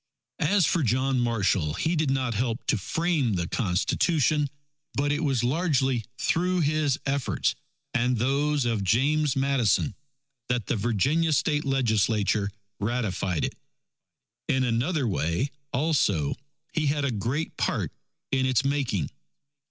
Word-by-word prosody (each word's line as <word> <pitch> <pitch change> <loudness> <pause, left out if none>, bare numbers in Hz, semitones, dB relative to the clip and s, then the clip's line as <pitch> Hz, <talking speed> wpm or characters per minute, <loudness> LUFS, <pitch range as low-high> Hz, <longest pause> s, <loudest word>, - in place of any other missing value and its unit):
As 185 +3 +3
for 170 - +1
John 130 +1 +1
Marshall, 100 -10 +1
he 160 - 0
did 155 -3 +1
not 130 -3 0
help 115 +2 -2
to - - +2
frame 160 - 0
the 85 -2 -1
Constitution; 145 - +1 0.5
but 145 +1 +1
it 150 +3 0
was 135 -5 +1
largely 135 -4 +1
through 180 +4 +1
his 150 -2 +1
efforts 135 -1 0 0.4
and 125 0 +1
those 140 +3 +1
of 115 -4 0
James 140 +8 +2
Madison, 135 -3 +2 0.6
that 125 -4 0
the - - 0
Virginia 125 - +1
State 150 0 +1
Legislature 110 -5 +1 0.3
ratified 100 -6 -1
it. - - -4 0.9
In 130 0 +2
another 125 +4 0
way, 95 - -1 0.2
also, 125 - +1 0.4
he 155 -3 0
had 145 0 +1
a 135 - 0
great 120 +9 -2
part - - -1 0.4
in 130 -1 +2
its 130 +1 +2
making. 130 - 0
130 Hz, 130 wpm, -26 LUFS, 115-150 Hz, 0.9 s, As